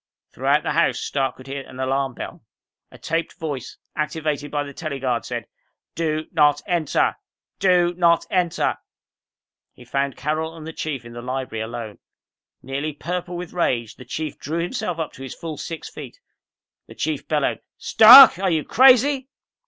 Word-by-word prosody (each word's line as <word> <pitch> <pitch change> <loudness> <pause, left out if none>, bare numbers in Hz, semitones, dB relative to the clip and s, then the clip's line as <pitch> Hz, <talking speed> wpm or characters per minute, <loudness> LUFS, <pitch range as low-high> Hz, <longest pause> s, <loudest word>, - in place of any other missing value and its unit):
Throughout - - +1
the - - -1
house, - - +2
Stark 135 -2 -2
could 130 - -14
hear 135 +1 -5
the 130 0 -6
alarm 135 -1 -1
bell. - - -8 0.5
A - - -15
taped 165 +1 -3
voice, 140 -6 -5 0.2
activated 150 -1 -2
by 145 0 -1
the 140 -1 -9
tele 155 -1 -5
guard, 125 -4 -1
said, - - -4 0.5
"Do 155 -1 -2
not 145 0 +4
enter! 170 -5 0 0.4
Do 180 -2 +3
not 170 -1 +3
enter!" 180 -3 0 1.0
He 125 - -15
found 135 +2 -2
Carol 160 +2 -2
and 160 -2 -10
the 160 - -7
Chief 140 -7 -4
in 120 - -11
the 120 - -7
library 130 -2 -4
alone. 115 -2 -7 0.6
Nearly 140 +4 -3
purple 180 +3 -4
with 175 -1 -7
rage, 120 -10 -1
the - - -11
Chief 150 +4 -5
drew 165 +4 -3
himself 180 -2 -3
up 160 -2 -4
to - - -13
his 135 - -7
full 160 -3 -7
six 165 -2 -6
feet. - - -10 0.7
The - - -13
Chief - - -3
bellowed, - - 0 0.2
"Stark! 230 -2 +9
Are 190 -1 +1
you 160 -3 +1
crazy?" 265 +2 +4
155 Hz, 170 wpm, -22 LUFS, 135-175 Hz, 1.0 s, Stark